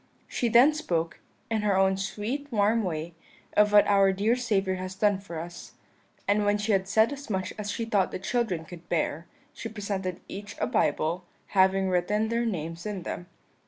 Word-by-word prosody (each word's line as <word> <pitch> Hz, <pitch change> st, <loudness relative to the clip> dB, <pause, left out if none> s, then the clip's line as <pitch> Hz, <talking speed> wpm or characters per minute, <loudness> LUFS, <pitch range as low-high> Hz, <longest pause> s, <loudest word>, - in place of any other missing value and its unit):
She 240 Hz, -, -1 dB
then 245 Hz, +7 st, +7 dB
spoke, 170 Hz, -, -2 dB, 0.3 s
in 220 Hz, -1 st, +1 dB
her 205 Hz, -2 st, +2 dB
own 190 Hz, 0 st, +4 dB
sweet 210 Hz, +9 st, -4 dB
warm 215 Hz, +1 st, +3 dB
way, 165 Hz, -2 st, -3 dB, 0.4 s
of 210 Hz, 0 st, +5 dB
what 205 Hz, 0 st, +7 dB
our 195 Hz, -1 st, +4 dB
dear 205 Hz, +5 st, +2 dB
Saviour 200 Hz, -6 st, 0 dB
has 185 Hz, 0 st, -5 dB
done 205 Hz, -1 st, +2 dB
for 170 Hz, -5 st, -7 dB
us, 175 Hz, +1 st, -9 dB, 0.5 s
and 205 Hz, +1 st, +3 dB
when 205 Hz, 0 st, +2 dB
she 210 Hz, +2 st, -1 dB
had 190 Hz, -1 st, +2 dB
said 220 Hz, +6 st, +3 dB
as 280 Hz, -2 st, -9 dB
much 190 Hz, -3 st, -2 dB
as 205 Hz, -1 st, -3 dB
she 230 Hz, +2 st, -2 dB
thought 205 Hz, -4 st, +2 dB
the -, -, -4 dB
children 190 Hz, -4 st, -1 dB
could 175 Hz, 0 st, -12 dB
bear, 165 Hz, -1 st, -1 dB, 0.3 s
she 225 Hz, -, -6 dB
presented 200 Hz, -4 st, -3 dB
each 205 Hz, +1 st, -7 dB
a -, -, +1 dB
Bible, 170 Hz, +3 st, 0 dB, 0.2 s
having 190 Hz, 0 st, +3 dB
written 200 Hz, +4 st, +1 dB
their 235 Hz, +1 st, 0 dB
names 165 Hz, -2 st, -4 dB
in 200 Hz, -4 st, -4 dB
them. 175 Hz, +1 st, -5 dB
200 Hz, 190 wpm, -27 LUFS, 185-215 Hz, 0.5 s, then